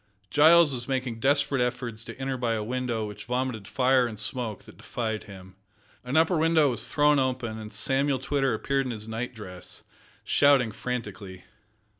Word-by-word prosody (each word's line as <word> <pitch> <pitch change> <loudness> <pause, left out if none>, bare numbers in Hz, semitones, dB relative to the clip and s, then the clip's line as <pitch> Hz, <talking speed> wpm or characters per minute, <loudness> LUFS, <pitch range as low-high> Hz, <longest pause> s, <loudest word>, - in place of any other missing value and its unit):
Giles 160 0 +6
was 120 -1 -4
making 130 -4 -2
desperate 140 0 +2
efforts 125 -2 -3
to 115 - -9
enter 135 0 -3
by 120 -2 -1
a 110 - -2
window 120 -1 -2
which 105 -1 -8
vomited 125 -4 -2
fire 130 -1 +3
and 110 -2 -7
smoke 110 -1 -4
that - - -15
defied 110 -3 -4
him. 95 -2 -13 0.5
An 125 +5 -1
upper 160 +1 +3
window 160 -3 +4
was 115 - -1
thrown 150 -1 +3
open, 125 -4 -2
and 105 -1 -8
Samuel 135 +5 +1
Twitter 135 -1 0
appeared 135 +3 -1
in - - -3
his 110 0 -7
night 115 +2 -4
dress, 90 -4 -9 0.4
shouting 140 -5 +4
frantically. 105 -6 -6
125 Hz, 170 wpm, -27 LUFS, 110-135 Hz, 0.5 s, Giles